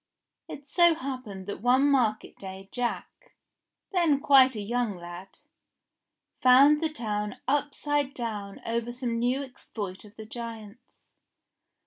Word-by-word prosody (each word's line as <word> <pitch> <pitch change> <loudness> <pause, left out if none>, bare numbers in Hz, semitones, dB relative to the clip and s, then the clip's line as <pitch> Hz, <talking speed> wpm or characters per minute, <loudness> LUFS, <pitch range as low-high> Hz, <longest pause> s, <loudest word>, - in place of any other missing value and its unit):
It 285 0 -9
so 345 +2 +4
happened 255 - -6
that 205 - -6
one 250 +3 +4
market 225 -6 +1
day 190 0 -8
Jack, 245 - -4 0.6
then 335 -7 +3
quite 270 -3 +6
a - - -4
young 225 -1 -1
lad, 175 +2 -10 1.0
found 275 +4 +6
the 320 - +1
town 210 -7 -3
upside 290 0 0
down 210 -5 -5
over 235 +1 -2
some 240 -2 -3
new 250 +4 0
ex 260 -2 -14
ploit 195 -4 -6
of 210 0 -16
the 220 - -9
giant's. 230 0 -10
240 Hz, 130 wpm, -27 LUFS, 210-275 Hz, 1.0 s, quite